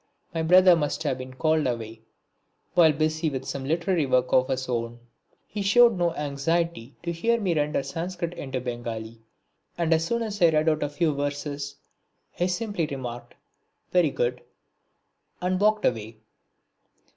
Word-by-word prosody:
My 165 - -1
brother 180 +2 +7
must 150 -2 -2
have 135 -4 -1
been 130 0 -8
called 155 0 +2
away 115 -2 -4 0.7
while 165 -3 +6
busy 155 +2 0
with 135 -2 -5
some 135 0 -4
literary 170 +1 +1
work 125 -1 +1
of 130 0 +4
his 130 -1 -2
own. 120 -1 -3 0.5
He 210 - -5
showed 230 +3 +5
no 175 -2 0
anxiety 145 -2 -2
to 170 - -2
hear 230 +8 +1
me 190 -5 0
render 150 -2 0
the - - -10
Sanscrit 170 +1 -4
into 135 -6 -4
Bengali, 115 -2 -6 0.6
and 165 -1 +2
as 160 0 +2
soon 235 +7 -1
as 205 -3 -5
I - - +8
had 165 - +4
read 155 +1 +3
out 155 -1 0
a 145 - 0
few 155 +1 0
verses 145 0 -4 0.6
he 175 - -1
simply 180 -2 -2
remarked 125 -4 -7 0.6
"Very 175 -4 +4
good" 125 -1 -1 1.0
and 185 +1 0
walked 215 0 +3
away. 110 -2 -1
155 Hz, 165 wpm, -26 LUFS, 130-175 Hz, 1.0 s, I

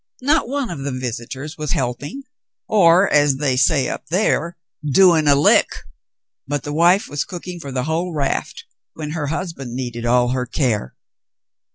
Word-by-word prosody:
Not 290 -2 +2
one 275 -5 -2
of 165 - -6
the 140 +1 -3
visitors 130 +4 -6
was 150 -2 -2
helping, 140 - -3 0.4
or, 185 -2 +5
as 145 -2 +4
they 135 -2 0
say 135 0 +2
up - - -6
there, 170 0 0 0.3
'doing 160 +1 +4
a 140 - +6
hck,' 145 - +4 0.7
but 145 0 -2
the 145 - -5
vdie 175 +6 +3
was 145 - -2
cooking 180 -1 -8
for 140 -4 -8
the 130 -1 -2
vrhole 165 +4 -2
raft 140 -2 -2 0.3
when 150 -2 -5
her 155 -2 -3
husband 150 -6 -5
needed 120 -2 -4
all 125 0 +3
her 125 0 -2
care. 115 - -1
145 Hz, 165 wpm, -20 LUFS, 130-170 Hz, 0.7 s, a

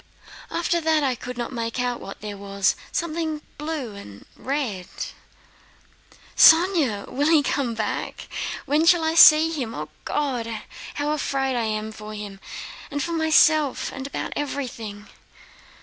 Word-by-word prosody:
"After 340 0 0
that, 315 -1 +2
I 265 -2 +2
could 250 +1 -7
not 240 +1 -4
make 230 +1 -3
out 245 -1 -1
what 195 - -9
there 210 -1 -5
was; 200 -1 0 0.2
something 320 -2 -2 0.2
blue 300 -7 -4
and 105 - -11
red...." 250 -10 -3 1.5
"Sónya! 320 - +5
When - - -10
will 290 +2 +3
he 310 -3 +5
come 265 -5 -1
back? 215 -2 -3 0.4
When 300 +4 +2
shall 345 -1 +6
I 320 0 +1
see 320 -1 +8
him! 255 -8 -4
O, - - -5 0.2
God, 240 -7 -2 0.3
how 295 +1 -1
afraid 270 -3 -1
I 235 -2 0
am 215 0 -2
for 215 0 -9
him 205 -2 -7 0.5
and 285 0 -2
for 340 - -3
myself 315 -3 +3
and 270 0 -5
about - - -4
everything!..." 230 -8 -4
270 Hz, 150 wpm, -24 LUFS, 220-310 Hz, 1.5 s, see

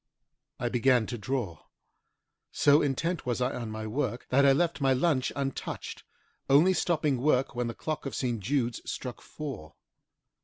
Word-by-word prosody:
I 120 - -1
began 125 -1 +3
to 120 +2 -5
draw. 105 - -3 0.9
So 145 +2 +5
intent 155 +4 -1
was 120 -1 0
I 125 +1 0
on 120 -3 -4
my 110 0 -5
work 120 +2 -2
that 140 +2 +5
I - - +7
left 160 +2 +1
my 135 -1 +4
lunch 130 -1 +1
untouched, 135 -1 -4 0.4
only 155 +7 +6
stopping 150 -7 +1
work 135 -2 +2
when 120 0 -1
the 115 - -5
clock 155 -2 -4
of - - -5
St. 120 -3 -1
Jude's 120 +2 -1
struck 125 -2 -6
four. 130 - -7
130 Hz, 160 wpm, -29 LUFS, 120-145 Hz, 0.9 s, I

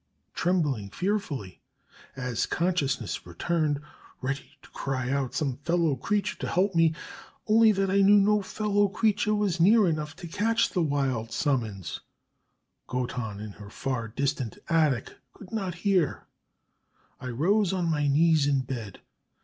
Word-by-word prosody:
Trembling 150 - 0
fearfully 155 - -3 0.5
as 125 -3 -2
consciousness 145 - -1
returned 150 - 0 0.4
ready 135 +2 -5
to - - -16
cry 130 -2 -3
out 140 0 +2
on 125 - -9
some 135 -5 -1
fellow 165 0 +1
creature 205 +10 -1
to - - -3
help 190 +3 +1
me, 165 -1 +3 0.5
only 220 0 +6
that 195 -2 0
I 200 +1 +4
knew 205 +1 +7
no 210 +1 +3
fellow 205 +1 +1
creature 210 +1 +1
was 200 -4 0
near 205 +4 +6
enough 155 -1 -2
to 175 -1 -8
catch 225 +7 +1
the 180 - 0
wild 135 -7 -1
summons 110 - -1 0.9
Goton 125 -4 -3
in 105 0 -6
her 100 0 -12
far 125 0 -3
distant 130 0 -2
attic 155 -7 +1 0.2
could 195 - -14
not 195 -6 -3
hear 185 -8 +1 0.9
I 130 - -7
rose 175 - +2
on 185 -2 -1
my 150 -3 +1
knees 155 0 +4
in 140 -2 +2
bed. 120 -7 -6
155 Hz, 145 wpm, -27 LUFS, 130-195 Hz, 0.9 s, knew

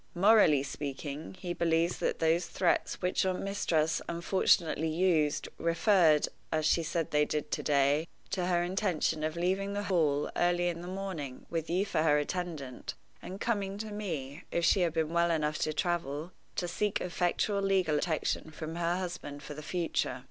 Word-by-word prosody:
Morally 180 -7 +5
speaking, 140 +3 -5
he 175 -2 -3
believes 165 0 +1
that - - 0
those 165 +2 +2
threats 180 -2 0
which 180 - +1
your 185 -1 +1
mistress 165 -6 0
unfortunately 170 -2 +2
used 160 -2 +1
referred 170 -2 +4 0.2
(as 155 -1 0
she 165 - +3
said 165 0 -2
they 150 0 +4
did 150 0 -2
to - - -1
day) 145 +2 +2 0.2
to 180 -2 -1
her 175 -1 +2
intention 175 -4 0
of 155 +1 -1
leaving 190 +3 0
the 205 0 -2
Hall 155 -7 +1
early 175 0 +2
in 170 -1 -4
the 175 - -7
morning, 185 -9 -5
with 165 -1 -2
you 185 +4 +1
for 175 - 0
her 150 -2 +4
attendant, 150 -4 -4 0.3
and 190 +2 -7
coming 200 -4 -1
to 215 0 -5
me, 165 -8 -5
if 170 - +1
she 195 - +4
had 170 -3 +1
been 160 -1 -1
well 170 0 +3
enough 155 -2 0
to 155 - 0
travel, 160 0 -2 0.2
to 175 - -1
seek 205 +4 -1
effectual 180 +3 0
legal 190 -5 +2
protection 160 0 -1
from 160 +1 -6
her 175 +1 0
husband 170 -6 -5
for 150 - -7
the 150 - -8
future. 165 -4 -1
170 Hz, 175 wpm, -31 LUFS, 155-185 Hz, 0.3 s, Morally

